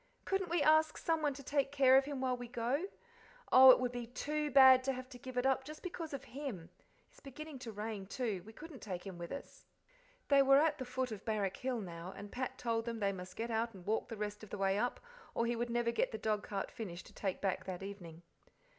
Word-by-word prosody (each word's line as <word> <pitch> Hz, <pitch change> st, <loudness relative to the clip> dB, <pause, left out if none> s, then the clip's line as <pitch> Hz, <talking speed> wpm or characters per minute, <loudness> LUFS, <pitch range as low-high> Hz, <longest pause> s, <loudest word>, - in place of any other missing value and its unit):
Couldn't 385 Hz, -2 st, 0 dB
we 340 Hz, -2 st, +2 dB
ask 315 Hz, 0 st, +4 dB
someone 310 Hz, -4 st, 0 dB
to 280 Hz, -, -9 dB
take 275 Hz, 0 st, 0 dB
care 270 Hz, -2 st, +6 dB
of 270 Hz, 0 st, +5 dB
him 280 Hz, -2 st, -4 dB
while 255 Hz, -1 st, +1 dB
we 245 Hz, 0 st, -7 dB
go? 245 Hz, +8 st, -1 dB, 0.7 s
Oh, 260 Hz, 0 st, +10 dB
it 255 Hz, -, +9 dB
would 250 Hz, -1 st, -1 dB
be 245 Hz, -1 st, -5 dB
TOO 300 Hz, +5 st, -2 dB
bad 260 Hz, -1 st, +8 dB
to 270 Hz, -, +1 dB
have 255 Hz, 0 st, -7 dB
to 250 Hz, -2 st, -11 dB
give 255 Hz, 0 st, -8 dB
it 250 Hz, -, +1 dB
up 265 Hz, 0 st, +2 dB
just 305 Hz, +3 st, -10 dB
because 340 Hz, -3 st, -5 dB
of 275 Hz, -, -5 dB
him. 240 Hz, -, -7 dB, 0.4 s
It's -, -, -20 dB
beginning 290 Hz, +1 st, -9 dB
to 235 Hz, -2 st, -6 dB
rain, 210 Hz, -2 st, -5 dB
too; 210 Hz, -3 st, -2 dB
we 220 Hz, -, -12 dB
couldn't 305 Hz, +3 st, -11 dB
take 185 Hz, -3 st, -5 dB
him 190 Hz, -3 st, -7 dB
with 170 Hz, -, -6 dB
us." 280 Hz, -, -9 dB, 0.6 s
They 280 Hz, -1 st, +6 dB
were 275 Hz, 0 st, +6 dB
at 300 Hz, 0 st, +3 dB
the 255 Hz, -, -4 dB
foot 255 Hz, 0 st, -2 dB
of 210 Hz, -2 st, -6 dB
Barrack 205 Hz, -4 st, -1 dB
Hill 255 Hz, -3 st, -2 dB
now, 175 Hz, -1 st, -7 dB
and 205 Hz, +1 st, -8 dB
Pat 255 Hz, +1 st, -4 dB
told 230 Hz, -2 st, -1 dB
them 235 Hz, -1 st, -3 dB
they 200 Hz, -1 st, +1 dB
must 185 Hz, -1 st, -8 dB
get 230 Hz, +1 st, -3 dB
out 225 Hz, 0 st, -1 dB
and 180 Hz, -2 st, -12 dB
walk 220 Hz, +2 st, -1 dB
the 225 Hz, -, -6 dB
rest 210 Hz, 0 st, -4 dB
of 215 Hz, -, -10 dB
the -, -, -5 dB
way 195 Hz, 0 st, +2 dB
up, 240 Hz, +4 st, -1 dB, 0.4 s
or 230 Hz, -, +1 dB
he 235 Hz, +1 st, 0 dB
would 240 Hz, +1 st, -2 dB
never 235 Hz, 0 st, +1 dB
get 235 Hz, -, 0 dB
the 220 Hz, -, -4 dB
dogcart 210 Hz, -2 st, -2 dB
finished 190 Hz, -7 st, -7 dB
to -, -, -15 dB
take 190 Hz, -3 st, -3 dB
back 195 Hz, -2 st, -1 dB
that 185 Hz, 0 st, -5 dB
evening. 175 Hz, -4 st, -9 dB
240 Hz, 245 wpm, -35 LUFS, 205-270 Hz, 0.7 s, Oh